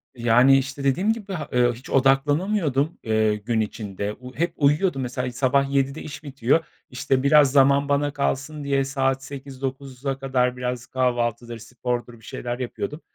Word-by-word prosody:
yani, 120 Hz, +3 st, +5 dB
işte 135 Hz, +1 st, -3 dB
dediğim 185 Hz, +11 st, +2 dB
gibi, 205 Hz, -4 st, -7 dB, 0.2 s
ııı, 120 Hz, -1 st, +3 dB
hiç 120 Hz, +3 st, -12 dB
odaklanamıyordum, 145 Hz, +3 st, +2 dB
ııı, 110 Hz, -1 st, +2 dB
gün 110 Hz, +2 st, -1 dB
içinde. 105 Hz, -1 st, -4 dB
U 125 Hz, 0 st, -10 dB
hep 170 Hz, +2 st, -1 dB
uyuyordum 145 Hz, +1 st, +2 dB
mesela, 125 Hz, 0 st, -3 dB
sabah 135 Hz, +2 st, +1 dB
07.00'de 140 Hz, +2 st, 0 dB
iş 145 Hz, 0 st, -8 dB
bitiyor. 140 Hz, +3 st, +1 dB, 0.2 s
İşte 130 Hz, +1 st, 0 dB
biraz 145 Hz, -1 st, +5 dB
zaman 140 Hz, +1 st, +4 dB
bana 145 Hz, 0 st, +1 dB
kalsın 145 Hz, +1 st, -2 dB
diye 140 Hz, -1 st, +1 dB
saat 135 Hz, -1 st, 0 dB
08.00-09.00'a 135 Hz, -1 st, -5 dB
kadar 125 Hz, -2 st, 0 dB
biraz 125 Hz, -1 st, -3 dB
kahvaltıdır, 120 Hz, -2 st, -1 dB
spordur 120 Hz, +1 st, -4 dB
bir 110 Hz, -, -18 dB
şeyler 120 Hz, +1 st, -5 dB
yapıyordum. 150 Hz, +5 st, -5 dB
135 Hz, 150 wpm, -23 LUFS, 125-140 Hz, 0.2 s, yani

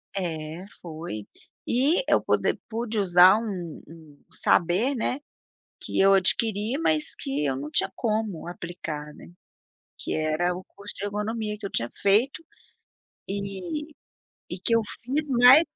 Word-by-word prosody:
Eh, 165 Hz, -2 st, -4 dB, 0.2 s
foi. 155 Hz, -, -7 dB, 0.4 s
E 285 Hz, -, +3 dB
eu -, -, +4 dB
poder -, -, +1 dB
pude 225 Hz, -1 st, -2 dB
usar 180 Hz, 0 st, +7 dB
um 190 Hz, -8 st, -5 dB
um 155 Hz, -2 st, -15 dB
saber, 190 Hz, +11 st, +2 dB
né, 250 Hz, +2 st, -1 dB, 0.6 s
que -, -, -4 dB
eu 195 Hz, 0 st, +6 dB
adquiri, 210 Hz, +4 st, +2 dB
mas 155 Hz, -, +1 dB
que 140 Hz, +2 st, -2 dB
eu 135 Hz, -2 st, 0 dB
não 145 Hz, +3 st, -5 dB
tinha 195 Hz, -, +2 dB
como 215 Hz, -7 st, -2 dB
aplicar, 160 Hz, -4 st, -6 dB
né, -, -, -13 dB, 0.7 s
que -, -, -4 dB
era 155 Hz, +3 st, 0 dB
o 185 Hz, -, -8 dB
curso 200 Hz, +1 st, -10 dB
de -, -, -5 dB
ergonomia 210 Hz, +1 st, -3 dB
que 205 Hz, -, -5 dB
eu -, -, -6 dB
tinha 120 Hz, +1 st, -1 dB
feito, 220 Hz, +10 st, +2 dB, 0.9 s
eh, -, -, -2 dB, 1.2 s
e 180 Hz, -, -5 dB
que 230 Hz, -, +2 dB
eu 230 Hz, -, +4 dB, 0.2 s
fiz, 290 Hz, +5 st, -1 dB
né, 250 Hz, +3 st, +8 dB
195 Hz, 145 wpm, -26 LUFS, 160-225 Hz, 1.2 s, né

